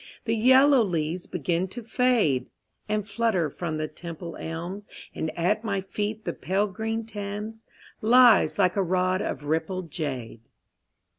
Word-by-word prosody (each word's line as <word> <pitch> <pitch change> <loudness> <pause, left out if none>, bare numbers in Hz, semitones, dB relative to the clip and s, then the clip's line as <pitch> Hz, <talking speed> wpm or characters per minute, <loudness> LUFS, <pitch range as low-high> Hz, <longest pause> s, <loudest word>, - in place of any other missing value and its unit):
The 225 - +1
yellow 260 +4 +6
leaves 170 -2 -2
begin 175 +2 -1
to 235 +6 -8
fade 220 - +2 0.4
And 210 -1 -1
flutter 200 -8 0
from 160 -1 -4
the 155 0 -2
Temple 170 +2 -8
elms, 175 +5 -6 0.3
And 160 - -3
at 205 +6 +1
my 200 -3 -1
feet 210 +3 -4
the - - -2
pale 195 +3 0
green 225 +3 -3
Thames 210 +1 -6 0.4
Lies 240 +1 +6
like 185 -3 +3
a 200 - +2
rod 185 +1 +1
of 140 - -3
rippled 160 +3 -2
jade. 130 -9 -4
190 Hz, 145 wpm, -26 LUFS, 165-220 Hz, 0.4 s, yellow